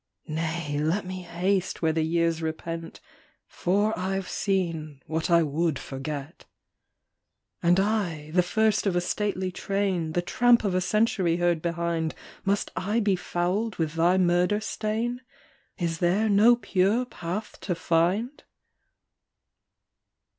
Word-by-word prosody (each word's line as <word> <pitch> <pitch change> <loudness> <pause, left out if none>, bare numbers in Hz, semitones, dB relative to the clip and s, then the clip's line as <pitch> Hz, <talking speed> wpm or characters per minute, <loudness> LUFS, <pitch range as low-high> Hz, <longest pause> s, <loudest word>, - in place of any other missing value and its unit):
" - - -58
Nay, 160 -1 -2
let 165 +7 0
me 185 0 -5
haste 180 +2 -1
where 160 -1 +3
the 160 - +1
years 165 0 +1
repent, 165 +1 -5 0.5
For 205 +4 0
I 190 +1 -1
ve 190 - -7
seen 165 -8 -2
what 160 +1 -2
I 170 -1 +5
would 155 0 0
forget." 140 +4 -6 0.6
" - - -56
And 175 +2 +4
I, 185 -8 -1
the 180 +2 +4
first 215 +3 +1
of 185 - +1
a - - +3
stately 190 0 -1
train, 185 -4 -1
The 175 - 0
tramp 240 +5 +4
of 200 -3 0
a 185 - +1
century 190 -4 +1
heard 175 -2 +1
behind, 170 -1 -1 0.3
Must 200 +1 0
I 210 +5 0
be 205 -3 +2
fouled 185 +5 -1
with 160 -2 -1
thy 170 +3 +3
murder 180 +3 +3
stain? 225 +3 -2 0.6
Is 165 -3 -2
there 190 +5 +2
no 215 +4 +6
pure 205 +2 +1
path 185 -1 -6
to 180 - -2
find? 180 - 0
180 Hz, 140 wpm, -26 LUFS, 165-200 Hz, 0.6 s, no